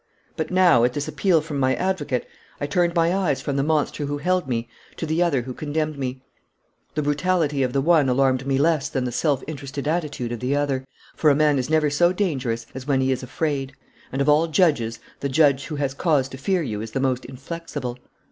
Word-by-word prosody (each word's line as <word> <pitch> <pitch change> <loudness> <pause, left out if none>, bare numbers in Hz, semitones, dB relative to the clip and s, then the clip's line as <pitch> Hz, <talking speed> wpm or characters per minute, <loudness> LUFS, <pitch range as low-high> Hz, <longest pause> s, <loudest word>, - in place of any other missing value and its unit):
But - - -3
now, 180 -10 +5
at 125 +1 +2
this 145 +2 -3
appeal 160 +2 +2
from 150 -2 -4
my 130 0 +2
advocate, 175 -9 -1 0.3
I - - -1
turned 170 +3 +1
my 170 +1 +3
eyes 185 -8 +1
from 140 - -3
the 140 - +2
monster 150 -1 0
who 145 0 -2
held 180 +1 0
me 115 -2 -2 0.3
to - - -3
the 160 +2 0
other 145 -8 +2
who 130 +1 -6
condemned 155 +1 -2
me. 130 0 -4 0.7
The 150 - 0
brutality 150 -1 +1
of 130 -1 +1
the 135 - +1
one 155 -3 +4
alarmed 130 0 +2
me 135 -1 +2
less 150 -1 +2
than 130 - -1
the 125 - -2
self 140 +1 0
interested 140 -1 -6
attitude 150 -7 -2
of 120 - -4
the 130 +4 0
other, 135 -2 -1 0.3
for 155 - +3
a 140 - +5
man 150 -1 +3
is 125 - -3
never 155 -2 +2
so 175 +4 +4
dangerous 130 - -1
as 130 +1 -8
when 135 -2 +2
he 130 0 +2
is 130 - -1
afraid, 135 0 -2 0.4
and 135 +1 0
of - - -4
all 150 +3 +4
judges 145 - +2 0.2
the 140 - -2
judge 140 -1 +3
who 155 - -4
has 140 -2 -1
cause 145 -3 +1
to 130 - -8
fear 180 +4 +1
you 105 -7 -3
is 110 0 -7
the 135 - 0
most 130 -1 0
inflexible. 135 -2 -6
145 Hz, 225 wpm, -23 LUFS, 130-160 Hz, 0.7 s, now